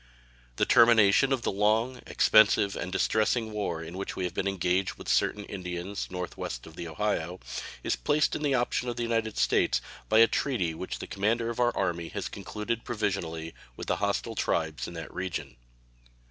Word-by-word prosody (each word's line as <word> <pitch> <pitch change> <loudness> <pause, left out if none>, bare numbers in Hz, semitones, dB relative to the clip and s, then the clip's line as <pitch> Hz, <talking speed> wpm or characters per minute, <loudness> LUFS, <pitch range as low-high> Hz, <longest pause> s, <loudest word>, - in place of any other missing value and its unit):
The - - +2
termination 115 +2 +6
of 130 -3 0
the - - 0
long, 110 +5 +1
expensive, 105 -2 +4
and 90 - -4
distressing 110 +3 +1
war 100 -6 -3
in 80 +2 -8
which 100 - -4
we 95 - -3
have 90 -1 -2
been 95 - -1
engaged 95 0 0
with - - -11
certain 105 -1 +1
Indians 90 0 -5
northwest 90 -9 -5
of 80 - -13
the 85 - -6
Ohio 90 0 -2 0.4
is - - +1
placed 145 - +1
in - - -3
the 145 -3 +2
option 125 0 0
of 120 - -3
the 120 - -2
United 115 -2 -1
States - - +3 0.3
by 110 - +4
a 115 - +9
treaty 110 -14 0
which 95 +3 -5
the - - -6
commander 115 +4 0
of 120 - -7
our 120 -1 +2
army 85 -3 -1
has - - -4
concluded 115 +2 -4
provisionally 85 -8 -3 0.2
with - - -6
the - - 0
hostile - - -1
tribes 80 -2 -1
in 85 - -8
that 80 -1 -7
region. 85 -8 -4
100 Hz, 185 wpm, -28 LUFS, 85-115 Hz, 0.4 s, a